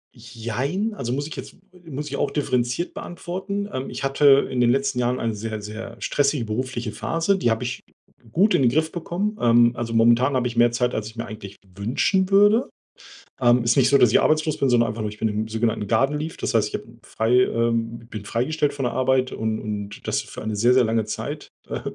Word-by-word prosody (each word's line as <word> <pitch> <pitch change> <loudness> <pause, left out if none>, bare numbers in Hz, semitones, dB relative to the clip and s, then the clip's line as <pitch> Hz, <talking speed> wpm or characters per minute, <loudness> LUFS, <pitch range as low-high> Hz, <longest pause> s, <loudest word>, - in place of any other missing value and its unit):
Jein, 125 - -3
also, 120 - -4
muss 140 +3 -2
ich - - -8
jetzt - - -8 0.3
muss 150 0 -5
ich 140 -1 -4
auch - - 0
differenziert 125 +2 -1
beantworten. 190 +4 -5
Ähm, 130 +1 -4
ich - - -6
hatte 140 0 +4
in 125 -1 -1
den 120 - +4
letzten 135 0 +1
Jahren 125 +1 0
eine 115 -1 -1
sehr, 110 +1 -5
sehr 110 +3 -8
stressige 140 -4 0
berufliche 120 +1 -3
Phase, 165 - 0
die 150 -11 +1
habe 110 0 0
ich - - -4 0.5
gut 205 - +3
in - - +3
den 125 - +5
Griff 155 +5 0
bekommen. 195 +5 -3
Ähm, 120 0 +5
also, 115 -1 -4
momentan 120 +4 +4
habe 125 -1 +1
ich 120 - -6
mehr 120 0 +4
Zeit, 125 +1 0
als 110 -1 -3
ich 110 - -11
mir 115 - -4
eigentlich 105 -3 -9 0.2
wünschen 155 - +1
würde. 205 +5 +4 0.7
Ähm, 120 -1 +4
ist 115 - +2
nicht 130 -1 +5
so, 140 - +5
dass 120 -4 +5
ich - - +5
arbeitslos 155 0 +1
bin, 135 - +2
sondern 120 -2 +3
einfach 110 - -6
nur 105 -1 -2
ich 105 - -12
bin 110 - 0
im 110 +1 -2
sogenannten 110 -2 -1
garden 135 +7 +1
leave. 160 +2 -5
Das - - -2
heißt, 105 -2 +2
ich - - -14
habe - - -3 0.2
frei 110 +1 -2
ähm, 115 0 -1
bin 105 -2 -7
freigestellt 145 +6 0
von 135 -2 -3
der 120 - -1
Arbeit 130 0 +1
und 110 0 -2
und 105 -1 -6
das - - 0
für - - -9
eine 110 -1 -3
sehr, 120 +4 +4
sehr 130 -2 +5
lange 110 -1 0
Zeit. - - -5 0.2
Äh. - - -3
120 Hz, 225 wpm, -23 LUFS, 115-145 Hz, 0.7 s, den